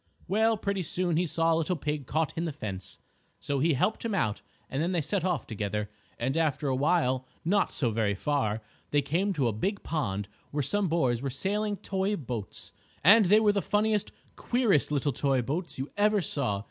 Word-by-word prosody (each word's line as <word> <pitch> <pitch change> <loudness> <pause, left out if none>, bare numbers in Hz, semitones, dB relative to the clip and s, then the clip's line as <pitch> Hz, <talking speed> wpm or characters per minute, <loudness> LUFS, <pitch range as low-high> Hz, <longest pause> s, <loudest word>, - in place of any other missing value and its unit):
Well, 220 +3 +3
pretty 200 -2 -1
soon 175 0 -1
he 175 +2 +1
saw 165 +1 +2
a - - +2
little 165 +3 0
pig 150 -3 -3
caught 160 -1 0
in 165 - -1
the 165 - -2
fence. 100 -8 -6 0.4
So 140 -1 -1
he 160 +3 +3
helped 145 +11 0
him 225 -3 -1
out 110 - 0 0.3
and 135 - -2
then 175 +3 0
they 170 - +1
set 175 +5 -1
off 180 -9 0
together, 105 -1 -3 0.3
and 130 +3 -1
after 155 -3 +1
a 130 - +1
while, 130 -3 +1 0.2
not 200 +4 +2
so 120 -5 +1
very 105 -2 +1
far, 110 -3 -1 0.3
they 145 -1 +2
came 175 +8 0
to 140 -8 +1
a 115 - 0
big 195 - -2
pond 105 -11 -2 0.2
where 145 0 -1
some 205 +8 +1
boys 130 -8 +1
were 140 - -2
sailing 205 +9 -1
toy 195 +2 -1
boats. 120 - -6 0.3
And 205 +6 +8
they 210 +4 +6
were 215 -1 +4
the 200 - +1
funniest, 210 0 +1 0.3
queerest 230 - +2
little 145 -1 +1
toy 135 0 +1
boats 165 +8 -3
you 135 +2 -4
ever 210 +1 +3
saw. 140 - -1
155 Hz, 200 wpm, -29 LUFS, 130-195 Hz, 0.4 s, And